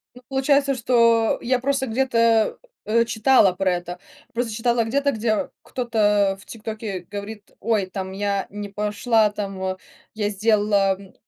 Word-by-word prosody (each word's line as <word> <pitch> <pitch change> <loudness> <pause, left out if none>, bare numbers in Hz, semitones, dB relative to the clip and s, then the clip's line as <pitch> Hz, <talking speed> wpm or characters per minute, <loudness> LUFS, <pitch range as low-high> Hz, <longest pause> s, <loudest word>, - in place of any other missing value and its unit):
Ну 250 - -13
получается, 275 +1 +2
что. 230 -2 +3
Я 250 +1 +1
просто 270 0 -1
где-то, 230 -2 +2 0.3
э, 230 +2 +2
читала 230 -2 +4
про 185 0 0
это, 175 0 -5 0.3
просто 235 -1 -2
читала 235 +2 +1
где-то, 280 +5 +1
где 220 -2 -1
кто-то, 210 -5 +1
а, - - -9
в 195 - -17
ТикТоке 215 -5 -6
говорит: 205 +1 -8
"Ой, 210 -3 0
там 190 -1 -5
я 200 0 -1
не 205 0 -6
пошла 210 +2 +1
там, 195 -2 -5
а, 185 0 -2 0.4
я 210 -1 -1
сделала, 205 -1 +2
м, 195 -1 -15
215 Hz, 155 wpm, -22 LUFS, 200-235 Hz, 0.4 s, читала